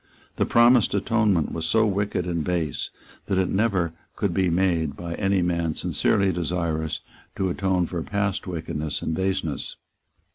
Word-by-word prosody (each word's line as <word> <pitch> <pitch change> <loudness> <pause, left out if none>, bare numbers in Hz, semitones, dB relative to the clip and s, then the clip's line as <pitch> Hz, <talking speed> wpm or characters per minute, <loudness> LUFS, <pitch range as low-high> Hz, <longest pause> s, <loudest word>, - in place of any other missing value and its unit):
The - - +1
promised 120 -2 +5
atonement 105 -5 +2
was 80 0 -2
so 110 0 +4
wicked 100 -3 0
and 85 -3 -1
base 80 -4 -1 0.4
that 95 - 0
it 95 -1 +2
never 95 -5 +1 0.2
could - - -1
be 95 -2 +2
made 85 -4 +1
by 85 -1 -5
any 95 -1 +1
man 85 -2 0
sincerely 100 -1 +2
desirous 85 -2 -2 0.3
to 95 -1 0
atone 95 -1 +1
for 85 0 -4
past 100 +1 -2
wickedness 80 -3 -3
and 80 - -1
baseness. 95 -4 -2
90 Hz, 150 wpm, -25 LUFS, 85-100 Hz, 0.4 s, promised